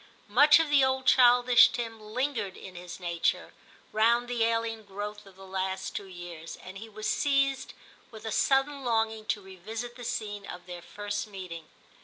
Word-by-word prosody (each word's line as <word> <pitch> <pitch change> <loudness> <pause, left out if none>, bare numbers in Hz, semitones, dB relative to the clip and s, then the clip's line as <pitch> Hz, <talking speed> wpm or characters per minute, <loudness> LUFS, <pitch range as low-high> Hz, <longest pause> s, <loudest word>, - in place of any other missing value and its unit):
Much 290 +5 +8
of 325 -2 0
the 280 -2 +6
old 265 0 +1
childish 245 -1 +7
Tim 225 -2 -5
lingered 220 -2 -3
in 190 - -10
his 175 0 -9
nature, 170 -2 -1 0.4
round 235 +3 +3
the 240 -2 0
alien 230 0 0
growth 205 +1 -7
of 195 - -16
the 195 0 -13
last 190 0 -3
two 200 - -5
years, 175 -3 -9
and 190 +1 -9
he 225 +2 -9
was 215 0 -5
seized 275 -2 +1 0.4
with 220 -2 -12
a 225 - -3
sudden 275 +4 +2
longing 225 -2 0
to 205 - -1
revisit 220 +6 -7
the 245 - -9
scene 210 -4 -4
of 180 0 -9
their 175 -1 -8
first 205 +3 -5
meeting. 180 -5 -8
220 Hz, 175 wpm, -29 LUFS, 190-245 Hz, 0.4 s, Much